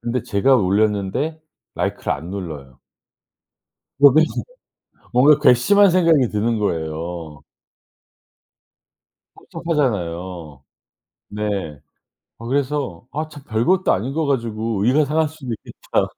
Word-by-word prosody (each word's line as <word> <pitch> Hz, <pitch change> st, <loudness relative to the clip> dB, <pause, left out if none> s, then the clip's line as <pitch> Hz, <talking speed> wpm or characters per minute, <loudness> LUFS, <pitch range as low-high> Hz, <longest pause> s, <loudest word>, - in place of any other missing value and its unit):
근데 120 Hz, +1 st, -2 dB
제가 130 Hz, +7 st, +3 dB
올렸는데 105 Hz, -, 0 dB, 0.3 s
라이크를 -, -, -2 dB
안 85 Hz, -, -6 dB
눌러요. 75 Hz, -9 st, -7 dB, 1.2 s
그러면 145 Hz, +3 st, +7 dB, 0.9 s
뭔가 140 Hz, +4 st, +5 dB
괘씸한 200 Hz, +12 st, +5 dB
생각이 165 Hz, -8 st, +3 dB
드는 110 Hz, +2 st, -1 dB
거예요. 80 Hz, -4 st, -4 dB, 1.9 s
섭섭하잖아요. 90 Hz, -, -3 dB, 0.7 s
네. 100 Hz, -8 st, -4 dB, 0.6 s
아 115 Hz, -, -9 dB
그래서 135 Hz, -, -2 dB
'아 155 Hz, +2 st, -3 dB
참 145 Hz, -2 st, -12 dB
별것도 140 Hz, +12 st, +1 dB
아닌 120 Hz, +8 st, -2 dB
거 160 Hz, +1 st, -1 dB
가지고 115 Hz, -5 st, -1 dB
의가 145 Hz, +5 st, +3 dB
상할 155 Hz, +2 st, 0 dB
수도 145 Hz, -5 st, -8 dB
있겠다.' 110 Hz, -, -3 dB
115 Hz, 235 characters per minute, -20 LUFS, 95-145 Hz, 1.9 s, 그러면